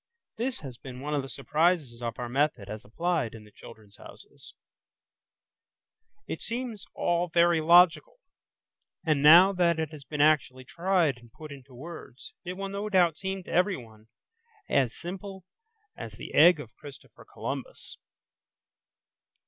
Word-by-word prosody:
This 245 +2 -3
has 130 -5 -9
been 130 -2 -9
one 150 +3 -4
of 145 - +1
the 135 - -9
surprises 150 -3 0
of 115 -1 -4
our 120 - -4
method 130 -5 0
as 110 +1 -7
applied 165 -3 -2
in 110 - -11
the 105 - -18
"Children's 105 -2 -15
Houses". - - -14 1.7
It - - -5 0.6
all 175 0 0
seems - - -37
very 170 -1 +4
logical, 180 - +5 0.9
and 155 -3 +2
now 175 +6 +8
that 175 -3 +2
it 160 -1 -3
has 150 -3 -11
been 145 +3 -7
actually 145 -4 +2
tried 170 -6 0
and 120 -1 -18
put 155 +4 -11
into 135 -2 -13
words, 150 -2 -11
it 180 0 -5
will 195 +1 -5
no 200 +2 -4
doubt 180 -5 +3
seem 190 +1 -5
to - - -10
everyone 120 - -1 0.6
as 130 -4 +2
simple 190 +1 -8 0.5
as - - -8
the - - -10
egg 165 +1 +6
of 120 -6 -10
Christopher 140 -3 -14
Columbus. - - -7
155 Hz, 150 wpm, -28 LUFS, 125-180 Hz, 1.7 s, now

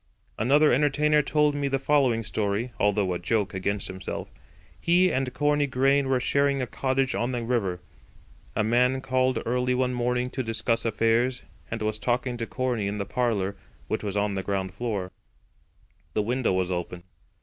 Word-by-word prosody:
Another 145 +5 +4
entertainer 150 +2 +3
told 150 +1 +2
me 145 -1 -1
the 135 0 +1
following 135 -4 +2
story, 110 +3 -2
although 100 -2 +2
a 90 - -3
joke 100 +2 0
against 100 +2 -1
himself. 95 0 -6 0.5
He 180 +2 +3
and 130 -1 0
Corney 145 +1 +1
Grain 135 +1 +2
were 130 -1 +2
sharing 140 +2 +1
a 130 - 0
cottage 130 +1 0
on 120 +2 -1
the 120 -1 -2
river. 100 -7 -1 0.7
A 110 - +2
man 125 +4 +2
called 130 -1 +1
early 125 +1 +1
one 125 0 +1
morning 125 +1 0
to 135 - -2
discuss 115 0 -1
affairs, 115 +3 +1 0.3
and 115 -1 -3
was 110 0 -1
talking 120 +2 -1
to 115 -1 -4
Corney 125 -5 -1
in 100 +1 -3
the 100 - -2
parlour, 105 -3 -1 0.3
which - - -1
was 100 -1 -2
on 100 0 +1
the 95 - -2
ground 95 -1 -2
floor. 100 -4 -3 1.0
The 105 - +2
window 125 +2 0
was 95 0 0
open. 90 0 -4
120 Hz, 170 wpm, -26 LUFS, 105-130 Hz, 1.0 s, Another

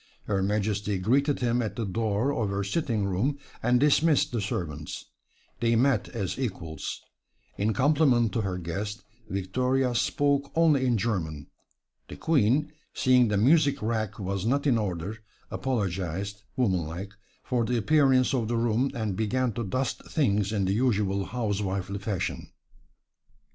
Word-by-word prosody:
Her 100 -2 -1
Majesty 105 0 0
greeted 135 +10 +1
him 120 0 +1
at 110 - -3
the 115 -2 -2
door 110 +6 0
of 110 -7 -1
her 100 0 -1
sitting 110 -1 -1
room, 105 +10 0 0.2
and 120 +1 +3
dismissed 150 +1 +3
the 120 -3 -1
servants. 80 -6 -4 0.5
They 115 0 +2
met 125 -2 +2
as 100 0 -4
equals. 90 -11 -4 0.5
In 105 +2 0
compliment 135 -4 +3
to 115 - 0
her 95 -3 -2
guest 100 +5 -4 0.3
Victoria 125 +7 0
spoke 140 +3 +1
only 155 -5 +4
in 120 -2 +2
German. 85 -10 -2 0.6
The - - -8
Queen, 145 -1 +2 0.2
seeing 125 -2 +4
the 105 -1 +1
music 145 +6 +4
rack 110 -2 -1
was 95 -1 -3
not 140 +6 +1
in 125 -5 +3
order, 100 +1 -3 0.3
apologized, 100 -4 -2 0.2
womanlike, 95 -4 -1 0.3
for 125 -2 0
the 120 +2 0
appearance 130 +1 +3
of 120 -4 0
the 120 +1 0
room 120 +3 +1
and 110 -4 -2
began 120 +3 0
to 120 - -3
dust 125 +6 -2
things 105 - +1
in 100 -3 0
the 95 - +1
usual 100 -4 +1
housewifely 100 -4 -2
fashion. 95 -2 -3
110 Hz, 145 wpm, -27 LUFS, 100-130 Hz, 0.6 s, only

